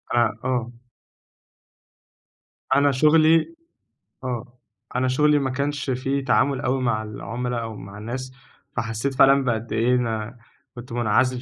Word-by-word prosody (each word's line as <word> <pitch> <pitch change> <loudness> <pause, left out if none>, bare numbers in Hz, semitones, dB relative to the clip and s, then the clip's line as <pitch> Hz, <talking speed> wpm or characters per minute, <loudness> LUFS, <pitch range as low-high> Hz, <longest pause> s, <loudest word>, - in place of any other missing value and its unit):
آآ، 120 - +5 0.2
آه. 125 -2 -1 2.0
أنا 140 0 +4
شُغلي 155 - +4 0.7
آه. 125 0 -5 0.4
أنا 130 +1 +1
شُغلي 150 +3 +3
ما 135 - -1
كانش 140 +1 -2
فيه 135 +2 -1
تعامل 140 +1 +2
أوي 130 +1 0
مع 110 -3 0
العُملا 120 +3 -4
أو 115 -1 -6
مع 100 0 -10
الناس، 125 +4 -5 0.4
فحسّيت 115 +4 -2
فعلًا 135 +1 +5
بقد 115 -2 -2
إيه 120 +3 +2
أنا 115 -1 -2 0.4
كنت 120 0 -10
مُنعزل 125 +2 +1
125 Hz, 125 wpm, -23 LUFS, 115-135 Hz, 2.0 s, آآ